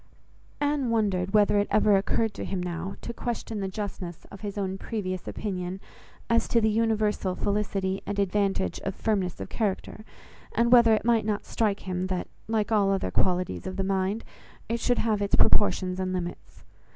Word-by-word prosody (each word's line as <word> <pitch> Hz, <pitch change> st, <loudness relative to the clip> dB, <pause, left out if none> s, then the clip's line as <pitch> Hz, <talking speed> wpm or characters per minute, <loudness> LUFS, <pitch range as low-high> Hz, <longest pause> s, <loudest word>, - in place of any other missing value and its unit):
Anne 290 Hz, -3 st, +1 dB
wondered 195 Hz, -5 st, +1 dB
whether 205 Hz, -1 st, +5 dB
it 205 Hz, -, +1 dB
ever 210 Hz, -1 st, +4 dB
occurred 210 Hz, +3 st, +1 dB
to -, -, -5 dB
him 195 Hz, -, -2 dB
now, 180 Hz, +1 st, -4 dB
to 235 Hz, -, -5 dB
question 230 Hz, -2 st, -4 dB
the 195 Hz, -, -2 dB
justness 190 Hz, -4 st, -5 dB
of 200 Hz, -, -10 dB
his 205 Hz, -1 st, -5 dB
own 190 Hz, -2 st, -1 dB
previous 185 Hz, -3 st, -4 dB
opinion 185 Hz, -2 st, -4 dB, 0.5 s
as 230 Hz, 0 st, +2 dB
to 235 Hz, -, +3 dB
the 220 Hz, -1 st, +2 dB
universal 215 Hz, -4 st, +1 dB
felicity 195 Hz, -2 st, -1 dB
and 205 Hz, -, -2 dB
advantage 195 Hz, -, +1 dB
of 195 Hz, -, -4 dB
firmness 195 Hz, -5 st, -1 dB
of -, -, -5 dB
character; 215 Hz, 0 st, -2 dB, 0.5 s
and 235 Hz, 0 st, +3 dB
whether 235 Hz, -3 st, +7 dB
it 215 Hz, -, -3 dB
might 230 Hz, -2 st, +3 dB
not 210 Hz, 0 st, -2 dB
strike 210 Hz, -3 st, 0 dB
him 185 Hz, 0 st, -2 dB
that, 185 Hz, -1 st, -2 dB, 0.2 s
like 220 Hz, -1 st, 0 dB
all 205 Hz, -3 st, +4 dB
other 195 Hz, -1 st, 0 dB
qualities 180 Hz, -, 0 dB
of 185 Hz, -, -4 dB
the 195 Hz, -, 0 dB
mind, 195 Hz, +3 st, 0 dB, 0.4 s
it 230 Hz, +1 st, -1 dB
should 245 Hz, +1 st, +1 dB
have 215 Hz, -2 st, +1 dB
its 200 Hz, -, +2 dB
proportions 185 Hz, -3 st, +3 dB
and 185 Hz, 0 st, -1 dB
limits. 175 Hz, -1 st, -6 dB
200 Hz, 180 wpm, -27 LUFS, 185-220 Hz, 0.5 s, whether